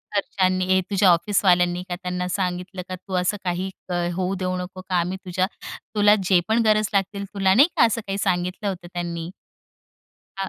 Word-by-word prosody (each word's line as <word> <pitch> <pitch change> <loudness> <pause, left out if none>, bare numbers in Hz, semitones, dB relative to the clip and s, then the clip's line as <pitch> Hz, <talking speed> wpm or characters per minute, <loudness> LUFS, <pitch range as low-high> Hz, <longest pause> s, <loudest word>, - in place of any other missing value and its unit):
घरच्यांनी 185 -2 +1
हे 185 0 +3
तुझ्या 195 -2 +4
ऑफिसवाल्यांनी 180 -1 +2
का, 175 - -2
त्यांना 180 0 -3
सांगितलं 180 0 -3
का, 185 - -3
तू 190 +1 -11
असं 205 +3 0
काही, 180 +1 -2 0.2
क - - -2 0.2
होऊ 185 +1 -1
देऊ 185 -1 -2
नको 180 +1 -6
का, 185 0 -4
आम्ही 180 +2 -2
तुझ्या 185 +1 0 0.5
तुला 210 0 +6
जे 185 -2 +6
पण 225 +1 +2
गरज 215 -1 +3
लागतील, 200 0 -1
तुला 195 -2 +3
नाही 270 +10 +6
का, - - +6
असं 230 0 0
काही 195 0 -2
सांगितलं 185 +1 -1
होतं 180 -2 -6
त्यांनी? 170 -1 -4 1.1
हां. 195 0 -3
185 Hz, 185 wpm, -23 LUFS, 180-200 Hz, 1.1 s, तुला